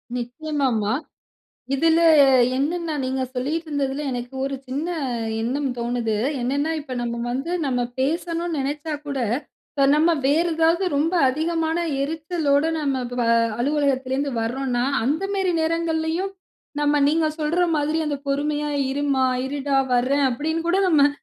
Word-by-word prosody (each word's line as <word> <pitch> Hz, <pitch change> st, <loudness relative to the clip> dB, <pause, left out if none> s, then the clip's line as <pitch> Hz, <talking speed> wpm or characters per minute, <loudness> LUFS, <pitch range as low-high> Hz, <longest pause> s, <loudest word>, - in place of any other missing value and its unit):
நிச்சயமா 275 Hz, +4 st, -2 dB
மா. 205 Hz, -, 0 dB, 0.8 s
இதுல 325 Hz, +4 st, +3 dB, 0.6 s
என்னென்னா 320 Hz, +3 st, -1 dB
நீங்க 260 Hz, 0 st, -1 dB
சொல்லிட்டு 310 Hz, +6 st, -2 dB
இருந்ததுல 280 Hz, -1 st, -2 dB
எனக்கு 245 Hz, +1 st, -5 dB
ஒரு 275 Hz, 0 st, -2 dB
சின்ன 285 Hz, +5 st, -2 dB, 0.6 s
எண்ணம் 270 Hz, +4 st, -1 dB
தோணுது. 235 Hz, -2 st, -1 dB, 0.2 s
என்னென்னா 280 Hz, +5 st, 0 dB
இப்ப 275 Hz, -3 st, -7 dB
நம்ம 235 Hz, 0 st, -3 dB
வந்து, 270 Hz, +7 st, -3 dB, 0.2 s
நம்ம 250 Hz, -2 st, 0 dB, 0.2 s
பேசணுனு 335 Hz, +3 st, -1 dB
நினச்சா 295 Hz, +3 st, -3 dB
கூட, 280 Hz, -2 st, -3 dB, 0.8 s
நம்ம 325 Hz, +3 st, +4 dB
வேறு 325 Hz, +5 st, +2 dB
ஏதாவது 330 Hz, +3 st, +3 dB
ரொம்ப 320 Hz, +5 st, +1 dB
அதிகமான 320 Hz, +3 st, 0 dB, 0.2 s
எரிச்சலோடு 310 Hz, 0 st, 0 dB
நம்ம 270 Hz, -4 st, -1 dB
ப 245 Hz, -, -2 dB, 0.4 s
அலுவலகத்திலருந்து 275 Hz, 0 st, 0 dB
வர்றோன்னா, 245 Hz, +1 st, -1 dB, 0.2 s
அந்த 300 Hz, +9 st, 0 dB
மாரி 380 Hz, -2 st, +1 dB
நேரங்கள்லயும் 330 Hz, +3 st, -1 dB, 0.5 s
நம்ம 295 Hz, 0 st, +2 dB
நீங்க 315 Hz, +1 st, +2 dB
சொல்ற 310 Hz, +4 st, +1 dB, 0.2 s
மாதிரி 300 Hz, +2 st, 0 dB
அந்த 290 Hz, -, -1 dB
பொறுமையா, 295 Hz, +1 st, 0 dB, 0.2 s
"இருமா, 275 Hz, -1 st, +1 dB, 0.2 s
இருடா 280 Hz, 0 st, -1 dB, 0.2 s
வர்றேன்," 270 Hz, +4 st, +2 dB
அப்டினு 320 Hz, +6 st, -2 dB
கூட 370 Hz, -, +3 dB
நம்ம 290 Hz, -4 st, +5 dB
290 Hz, 125 wpm, -23 LUFS, 265-320 Hz, 0.8 s, நம்ம